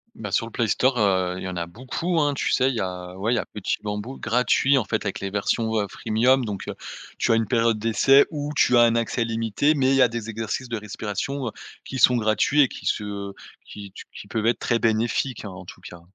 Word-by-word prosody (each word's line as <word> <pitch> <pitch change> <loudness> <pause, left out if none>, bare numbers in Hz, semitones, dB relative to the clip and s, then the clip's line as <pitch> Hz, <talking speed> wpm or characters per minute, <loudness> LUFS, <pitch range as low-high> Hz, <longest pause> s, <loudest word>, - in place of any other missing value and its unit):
Bah, 105 -3 -7
sur 115 - +1
le - - -11
Play 115 -1 0
Store, 130 +4 +2
heu, 95 -4 +1
il - - -7
y - - -4
en 90 - -5
a 85 -1 -3
beaucoup, 130 - -3
hein, 145 -1 +2
tu - - -1
sais, 130 +1 +3
il 130 - -2
y - - -2
a 90 -1 -5
ouais, 110 +5 0
il - - +2
y - - +1
a - - -3
Petit 105 - -3
BamBou 105 +5 -5
gratuit, 125 +3 +2
en 125 - +2
fait 110 +1 -2
avec 100 - -3
les 100 - -4
versions, 110 +3 -1
heu, 100 - -1
freemium, 120 +6 +1
donc, 100 -3 -5
heu, - - -5 0.4
tu - - +1
as - - +5
une 115 -1 +1
période 115 -2 +2
d'essai 115 +5 +4
ou 145 -1 -4
tu 125 - +4
as 120 - +7
un 115 0 +4
accès 115 0 0
limité, 115 +6 +1
mais 130 -2 +2
il 135 - +3
y 135 - +4
a 125 - +7
des 115 -1 -6
exercices 115 +3 -4
de 115 - -2
respiration, 105 +5 -4
heu, - - -3 0.3
qui 130 - -5
sont 125 0 +6
gratuits 110 +7 +2
et 135 - +5
qui - - -11
se 100 -2 -3 0.3
qui 100 -1 -10
tu - - -11
qui - - -11
peuvent 110 +1 -2
être 120 -1 +1
très 120 - 0
bénéfiques, 115 +2 0
hein, - - -5
en 90 0 -10
tout - - -12
cas. 85 -1 -11
115 Hz, 260 wpm, -24 LUFS, 105-125 Hz, 0.4 s, as